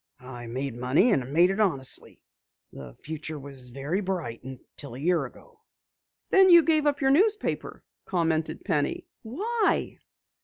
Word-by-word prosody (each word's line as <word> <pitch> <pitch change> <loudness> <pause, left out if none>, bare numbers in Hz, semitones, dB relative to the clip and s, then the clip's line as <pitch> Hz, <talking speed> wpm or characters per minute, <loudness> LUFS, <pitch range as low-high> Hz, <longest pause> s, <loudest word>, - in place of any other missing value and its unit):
I 120 -2 -8
made 130 +2 -4
money 130 - +2
and 135 -8 0
made 175 +5 +4
it 195 - -3
honestly. 155 -11 -1 0.5
The 65 -3 -10
future 155 0 -6
was 135 -3 -7
very 140 +10 -3
bright 175 - -4
until 130 0 -9
a - - -8
year 165 -1 +1
ago." 125 - -15 0.7
"Then 385 -1 +6
you 340 -2 +8
gave 310 -2 +3
up 285 -1 0
your 270 0 +3
newspaper," 420 +8 +1 0.2
commented 165 -4 -1
Penny. 150 -7 -1 0.2
"Why?" 415 - -1
160 Hz, 145 wpm, -26 LUFS, -, 0.7 s, you